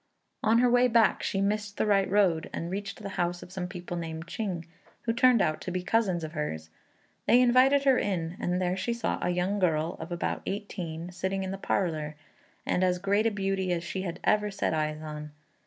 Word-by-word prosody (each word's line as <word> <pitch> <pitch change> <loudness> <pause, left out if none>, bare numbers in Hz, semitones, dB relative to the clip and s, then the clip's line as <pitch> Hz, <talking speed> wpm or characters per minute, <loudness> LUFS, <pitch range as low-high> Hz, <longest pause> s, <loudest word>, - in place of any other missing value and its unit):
On 220 +1 +4
her 250 +1 +5
way 245 +1 +5
back 225 -3 +3
she 195 - -1
missed 205 0 -1
the - - +1
right 200 -2 +3
road 185 -5 +2
and 170 +1 -4
reached 200 +1 -5
the 200 - -4
house 175 0 -1
of 180 - -13
some 185 -2 -4
people 180 -1 -6
named 165 -1 -5
Ching, 175 -2 -4 0.4
who 230 - 0
turned 245 -2 +5
out 155 0 0
to 185 - -4
be 180 0 -2
cousins 190 -4 +1
of 155 - -5
hers. 80 - -4 0.6
They 240 - +6
invited 255 +3 +5
her 270 -2 +4
in, 175 -4 -2
and 180 +1 0
there 180 0 0
she 215 +5 -1
saw 235 -1 -2
a - - 0
young 180 +3 0
girl 165 -2 +1
of 160 +2 -7
about 175 - -2
eighteen 180 -4 -4
sitting 190 +2 -2
in 190 - -3
the 195 - -4
parlour, 155 -7 -1 0.5
and 180 - +1
as 180 -1 +2
great 200 +4 +2
a - - +4
beauty 195 -2 -1
as 170 -1 -1
she 185 +3 -4
had 175 -3 -4
ever 210 0 +2
set 195 - -1
eyes 155 0 -1
on. 150 -1 -7
185 Hz, 215 wpm, -28 LUFS, 170-210 Hz, 0.6 s, They